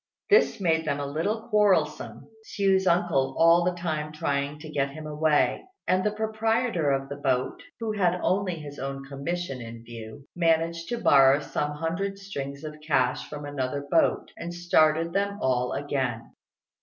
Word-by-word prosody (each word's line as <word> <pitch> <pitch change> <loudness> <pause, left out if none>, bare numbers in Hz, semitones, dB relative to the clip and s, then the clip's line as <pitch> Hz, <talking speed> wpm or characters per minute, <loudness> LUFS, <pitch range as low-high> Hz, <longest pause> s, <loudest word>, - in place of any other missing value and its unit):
This 410 - +5
made 160 -4 +1
them 145 -2 -1
a 145 - -2
little 170 +11 -2
quarrelsome, 195 -8 +1 0.2
Hsiu's 195 -3 +1
uncle 160 -7 +2
all 165 +1 +6
the 180 0 0
time 155 -3 -3
trying 145 -1 -2
to 155 +1 -10
get 140 -2 0
him 155 +2 -9
away; 150 0 +1 0.2
and 185 0 +2
the 210 - +2
proprietor 220 - 0
of 135 0 0
the 140 +1 -6
boat, 130 -3 -1 0.2
who 225 -1 -2
had 180 -4 +1
only 190 -2 +1
his 145 -3 -9
own 135 0 -5
commission 140 0 -4
in 115 0 -9
view, 115 +3 -10
managed 165 0 +1
to 240 - -1
borrow 135 -7 +5
some 150 0 -3
hundred 170 +6 -3
strings 140 -8 -6
of 150 -1 -7
cash 140 -5 0
from 145 -1 -7
another 140 0 -3
boat, 165 - +2
and 175 +1 -6
started 165 -1 +2
them 200 +1 0
all 125 -4 0
again. 130 -5 -2
155 Hz, 165 wpm, -26 LUFS, 140-180 Hz, 0.2 s, all